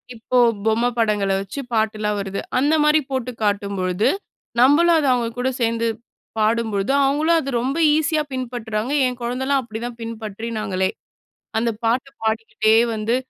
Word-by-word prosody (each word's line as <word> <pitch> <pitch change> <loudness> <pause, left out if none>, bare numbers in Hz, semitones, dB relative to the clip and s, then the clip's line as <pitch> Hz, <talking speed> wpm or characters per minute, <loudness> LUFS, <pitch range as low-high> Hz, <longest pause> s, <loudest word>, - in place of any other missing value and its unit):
இப்போ 230 +2 -2 0.3
பொம்மை 225 +2 +2
படங்கள 210 -3 +1
வச்சு 195 +8 -7
பாட்டுலாம் 215 -1 0
வருது. 195 0 -4 0.2
அந்த 285 +4 +3
மாரி 300 +1 +5
போட்டுக் 250 -3 -4
காட்டும்பொழுது, 200 -1 0 0.5
நம்பளும் 310 +7 +5
அத 300 - 0
அவங்க 240 -2 0
கூட 255 +1 +1
சேந்து 230 0 +1 0.5
பாடும்பொழுது, 215 -1 +1
அவங்களும் 305 +5 +2
அத 275 -3 -4
ரொம்ப 270 +5 -2 0.2
ஈஸியா 310 0 +1
பின்பற்றுறாங்க. 240 -2 -3 0.2
என் 250 -1 -5
குழந்தலாம் 265 +3 0
அப்டி 220 -1 -7
தான் 240 -1 -7
பின்பற்றினாங்களே. 215 -3 -3 0.7
அந்த 235 +1 +1 0.2
பாட்டு 245 +4 +1
பாடிக்கிட்டே 220 0 +1 0.2
வந்து, 220 +2 0
230 Hz, 135 wpm, -21 LUFS, 215-255 Hz, 0.7 s, மாரி